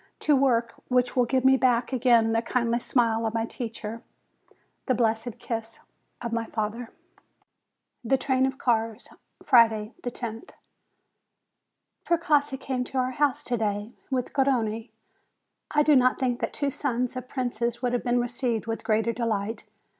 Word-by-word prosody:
To 300 - +4
work, 240 -4 +2
which 250 -1 +1
will 250 -1 +4
give 260 +1 0
me 265 0 +6
back 245 0 +2
again 235 -3 +4
the 225 0 +2
kindly 235 0 0
smile 230 -2 +1
of 220 - -4
my 225 0 0
teacher, 230 -1 -6 0.9
the 255 - +2
blessed 225 0 0
kiss 225 -1 -5 0.4
of 235 -1 -3
my 230 0 -1
father! 225 +2 -4 1.1
THE 265 +3 +2
TRAIN 260 0 +1
OF 265 0 -4
CARS 225 -2 -1 0.3
Friday, 225 -1 +4
loth. 235 -2 -6 1.5
Precossi 300 -5 +2
came 260 -2 -2
to 265 - -6
our 255 0 +1
house 285 0 0
to 245 - -1
day 210 0 -2 0.2
with 255 -2 -2
Garrone. 235 -5 0 0.8
I 295 -1 +3
do 300 -1 +5
not 255 -1 +4
think 250 -2 0
that - - -2
two 285 -1 -1
sons 250 -3 -2
of 255 0 -6
princes 240 -2 -2
would 245 -1 +1
have 245 - 0
been 245 0 +2
received 240 -2 -1
with 225 0 -4
greater 225 +1 +1
delight. 220 -2 -2
240 Hz, 155 wpm, -26 LUFS, 225-255 Hz, 1.5 s, me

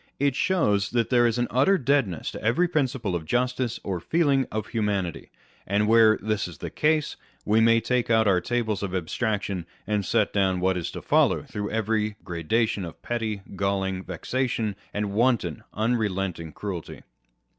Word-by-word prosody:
It 140 -1 +2
shows 105 - +2
that 120 0 0
there 120 -1 +5
is 115 - 0
an 120 - +1
utter 140 +11 +4
deadness 135 - 0
to - - -8
every 120 +12 +3
principle 130 - -1
of 85 - -3
justice 125 +4 -1
or 95 -3 -2
feeling 140 - +2
of 110 0 -3
humanity; 100 -6 -2 0.4
and 105 +2 +1
where 110 -1 +6
this 105 -2 -1
is 85 -4 -10
the - - -6
case, 155 -1 +1 0.3
we 110 +2 +3
may 115 0 +5
take 120 +1 0
out 110 -1 +4
our 90 -3 +3
tables 110 0 -1
of 95 -2 -3
abstraction, 95 0 -2 0.2
and 105 0 0
set - - +1
down 95 -2 +2
what 95 +1 +1
is 90 -2 -3
to - - -7
follow - - +3
through 105 0 -5
every 110 -1 0
gradation 100 +5 0
of 85 -2 -8
petty, 110 -4 -3
galling 95 -1 -1
vexation, 110 +3 -2 0.2
and 105 -1 -2
wanton, 110 - +1
unrelent 105 -5 -1
ing 80 -1 -7
cruelty. 90 0 -6
110 Hz, 170 wpm, -25 LUFS, 95-120 Hz, 0.4 s, where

